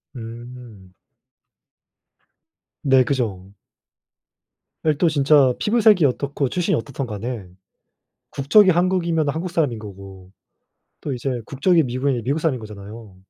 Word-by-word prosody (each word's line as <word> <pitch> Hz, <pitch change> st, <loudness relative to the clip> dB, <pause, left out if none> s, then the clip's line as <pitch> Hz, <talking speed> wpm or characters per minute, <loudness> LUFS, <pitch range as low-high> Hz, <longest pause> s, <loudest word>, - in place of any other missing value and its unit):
음. 115 Hz, -4 st, -10 dB, 1.9 s
네. 135 Hz, -2 st, +4 dB
그죠. 105 Hz, -8 st, -3 dB, 1.3 s
네. 155 Hz, -, +3 dB
또 170 Hz, -1 st, +3 dB
진짜 140 Hz, -3 st, +4 dB
피부색이 210 Hz, -6 st, +4 dB
어떻고 140 Hz, 0 st, -1 dB
출신이 175 Hz, -2 st, 0 dB
어떻든 135 Hz, +3 st, -4 dB
간에 110 Hz, -1 st, -5 dB, 0.8 s
국적이 185 Hz, +9 st, +4 dB
한국이면은 170 Hz, -4 st, +1 dB
한국 170 Hz, +4 st, -4 dB
사람인 150 Hz, -9 st, 0 dB
거고 95 Hz, -3 st, -11 dB, 0.7 s
또 145 Hz, -, -4 dB
이제 125 Hz, 0 st, -3 dB
국적이 165 Hz, +5 st, +2 dB
미국이면 130 Hz, -1 st, -1 dB
미국 140 Hz, +4 st, 0 dB
사람인 150 Hz, -7 st, -1 dB
거잖아요. 105 Hz, -1 st, -11 dB
130 Hz, 255 characters per minute, -21 LUFS, 115-155 Hz, 1.9 s, 네